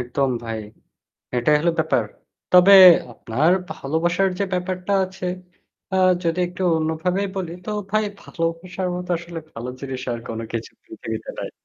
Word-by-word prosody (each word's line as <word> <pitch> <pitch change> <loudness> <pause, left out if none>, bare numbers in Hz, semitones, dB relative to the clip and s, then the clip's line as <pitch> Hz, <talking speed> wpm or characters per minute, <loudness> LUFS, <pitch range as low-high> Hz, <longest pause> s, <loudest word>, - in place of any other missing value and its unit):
একদম 130 +2 0
ভাই। 115 -1 -4 0.8
এটাই 150 +5 +4
হলো 170 +2 +2
ব্যাপার। 160 0 +2 0.5
তবে 180 +2 +8 0.4
আপনার 135 +9 0 0.2
ভালোবাসার 170 +6 0
যে 200 - +1
ব্যাপারটা 185 +1 -2
আছে, 185 0 -7 0.7
আ - - +2 0.3
যদি 165 +1 0
একটু 180 +1 -7 0.2
অন্যভাবে 160 +5 -1
বলি 180 -3 -3
তো - - -3 0.2
ভাই 215 +1 +2 0.2
ভালোবাসার 175 +3 -3
মতো 180 0 -6
আসলে 170 -1 -8
ভালো 120 +2 -6
জিনিস 135 -2 -5
আর 120 - -4
কোনো 115 0 -4
কিছু 115 -1 -4
পৃথিবীতে 340 +8 -6
নাই। - - -4
170 Hz, 145 wpm, -22 LUFS, 140-185 Hz, 0.8 s, তবে